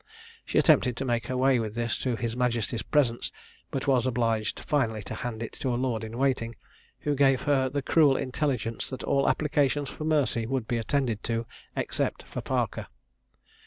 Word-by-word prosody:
She - - -1
attempted 125 -1 +4
to 135 - -2
make 120 -2 0
her 130 - -2
way 130 -1 +4
with 110 -1 -3
this 120 0 -1
to 125 -2 0
his 115 0 -3
majesty's 120 -2 0
presence, 120 -2 +1 0.4
but 135 - -3
was 130 -3 +3
obliged 115 -3 0
finally 115 -8 0
to - - -6
hand 115 -2 -4
it 115 - -6
to 130 - 0
a - - +1
lord 120 -3 -1
in 110 +1 -6
waiting, 125 -4 0 0.5
who 145 - 0
gave 135 -2 +3
her 135 -2 +2
the 140 +1 -2
cruel 145 -4 +4
intelligence 130 -4 -2
that 130 - -6
all 140 - +2
applications 145 -1 +1
for 155 - -7
mercy 140 -7 +1
would 130 -3 -2
be 120 - 0
attended 120 -2 0
to, 115 0 -1 0.3
except - - -1
for - - -6
Parker. - - -1
125 Hz, 185 wpm, -28 LUFS, 115-135 Hz, 0.5 s, attempted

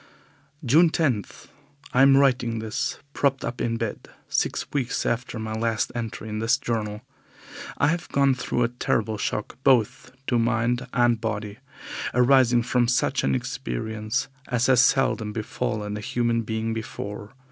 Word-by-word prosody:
June 160 +8 +5
10. 135 -11 +1 0.7
I 125 - +4
am 135 0 +7
writing 125 -4 +2
this, 110 -1 -2 0.2
propped 140 -1 +1
up 120 - -4
in 115 -1 0
bed, 115 -2 -5 0.2
six - - -1
weeks 130 -4 -1
after 120 +1 -2
my 110 0 -4
last 110 0 -1
entry 115 -2 -5
in 110 0 -4
this 115 +2 +2
journal. 105 -2 -3 0.8
I - - +3
have 170 +1 -2
gone 140 -1 +3
through 125 -1 -1
a - - +3
terrible 110 -3 -1
shock 105 - -3
both 130 -1 +2
to 120 -3 +1
mind 120 +2 0
and 120 -2 +2
body, 105 -2 -4 0.6
arising 125 -1 +5
from 125 0 +1
such 125 - +1
an 70 - +2
experience 110 - -3 0.2
as 125 0 +1
has 130 -2 +5
seldom 125 -5 +2
befallen 105 -1 -3
a - - -4
human 115 +1 0
being 110 0 -2
before. 105 0 -6
115 Hz, 150 wpm, -25 LUFS, 110-125 Hz, 0.8 s, am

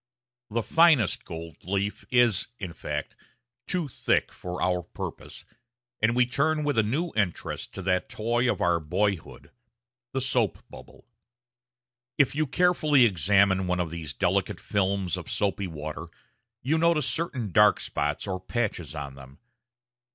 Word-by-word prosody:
The 115 +1 -1
finest 160 - +4
gold 80 -1 -8
leaf 100 +3 -2
is, 120 -5 +3
in 90 -6 -6
fact, - - -5 0.5
too 175 -4 0
thick 125 - 0
for 90 0 -6
our 90 -1 +1
purpose, - - -8 0.6
and 110 +2 +3
we 125 0 +4
turn 150 +5 +1
with 145 -2 0
a - - +7
new 145 +11 -1
interest 100 -5 -2
to 95 - -6
that 90 0 0
toy 120 +3 0
of - - -4
our 85 -1 +3
boyhood 95 +3 -2 0.6
the 135 - -1
soap 125 -6 0
bubble. - - -13 1.1
If 145 - +3
you 155 +1 0
carefully 155 -4 +4
examine 95 0 +3
one 90 0 0
of 85 -3 -2
these 80 -4 -5
delicate 65 - 0
films 95 -3 0
of - - -8
soapy 100 -1 -1
water, 80 0 -6 0.6
you 155 +5 +1
notice 165 -2 +3
certain 130 - -2
dark 105 +2 +5
spots 75 +1 -2
or 95 -2 -3
patches 95 - -3
on 70 -2 -5
them. 70 +1 -14
100 Hz, 145 wpm, -27 LUFS, 90-130 Hz, 1.1 s, a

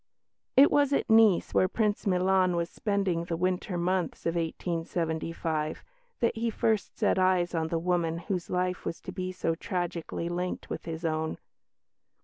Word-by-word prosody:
It 275 +2 +8
was 285 -1 +3
at 275 - +1
Nice, 220 -5 +5
where 185 - +4
Prince 210 +1 0
Milan 185 -1 +3
was 170 0 -1
spending 195 -5 -1
the 170 -1 -3
winter 180 +1 -1
months 180 +1 -1
of 165 - +1
1875, 165 -2 -2 0.4
that 235 - +2
he 230 +1 0
first 220 -1 0
set - - +2
eyes 185 -2 +2
on 160 -1 0
the 165 - -1
woman 170 -1 0
whose 180 0 -3
life 180 0 -1
was 165 - -4
to - - -7
be 185 0 -4
so 175 -2 -1
tragically 170 -1 -3
linked 180 +1 -3
with - - -5
his 165 0 -5
own. 160 0 -1
180 Hz, 160 wpm, -29 LUFS, 165-190 Hz, 0.4 s, It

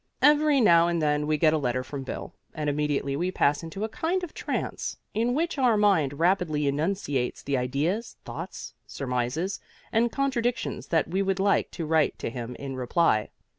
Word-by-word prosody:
Every 295 -1 +5
now 170 -7 +6
and 170 -1 0
then 150 -1 +1
we 155 0 +2
get 155 0 +4
a 155 - +2
letter 130 -2 -1
from 135 +2 -6
Bill, 130 - -6 0.2
and 150 -1 -1
immediately 145 -1 -1
we 175 +5 0
pass 145 -5 +2
into 170 +5 -6
a - - 0
kind 355 +9 -1
of 345 - -6
trance, - - -3 0.2
in 235 +3 +1
which 325 -1 -1
our 245 -4 +4
mind 195 -10 +3
rapidly 165 -2 +1
enunciates 145 -3 -1
the 140 - -1
ideas, 145 - -1
thoughts, - - -7
surmises 130 +8 -2 0.3
and 230 +1 +2
contradictions 250 -3 -1
that 160 -2 +1
we 185 +4 0
would 195 -1 0
like 200 +1 +2
to 165 - -4
write 155 -1 +2
to - - -4
him 120 0 -6
in 135 -1 -6
reply. 125 -3 +1
165 Hz, 180 wpm, -27 LUFS, 140-210 Hz, 0.3 s, now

